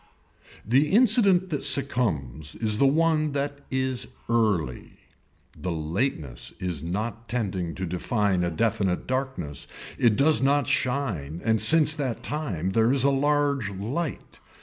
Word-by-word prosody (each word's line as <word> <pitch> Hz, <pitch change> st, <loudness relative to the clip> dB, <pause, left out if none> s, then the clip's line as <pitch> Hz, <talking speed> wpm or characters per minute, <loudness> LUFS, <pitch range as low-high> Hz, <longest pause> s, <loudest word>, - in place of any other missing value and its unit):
The 135 Hz, +7 st, +3 dB
incident 200 Hz, -5 st, +4 dB
that 145 Hz, -, -2 dB
succumbs 95 Hz, -, 0 dB
is 110 Hz, -1 st, 0 dB
the 140 Hz, -, +5 dB
one 155 Hz, 0 st, +2 dB
that 140 Hz, 0 st, -3 dB
is 130 Hz, -1 st, -1 dB, 0.2 s
early. 105 Hz, -, 0 dB, 0.6 s
The 90 Hz, -, -4 dB
lateness 80 Hz, -, -3 dB
is 90 Hz, -5 st, -3 dB
not 110 Hz, +7 st, -4 dB
tending 95 Hz, -8 st, -3 dB
to 95 Hz, -, -3 dB
define 95 Hz, +1 st, 0 dB
a 85 Hz, -, 0 dB
definite 95 Hz, 0 st, -1 dB
darkness, 130 Hz, -, -3 dB, 0.3 s
it 115 Hz, -4 st, +4 dB
does 145 Hz, +4 st, +4 dB
not 140 Hz, +1 st, +2 dB
shine 105 Hz, -, -1 dB
and 110 Hz, -1 st, +2 dB
since 155 Hz, -1 st, +6 dB
that 135 Hz, -6 st, -4 dB
time 100 Hz, -, -3 dB
there 115 Hz, +3 st, +3 dB
is 135 Hz, -2 st, +2 dB
a 140 Hz, -, +4 dB
large 140 Hz, -4 st, +1 dB
light. 120 Hz, -, -5 dB
120 Hz, 135 wpm, -25 LUFS, 90-140 Hz, 0.6 s, since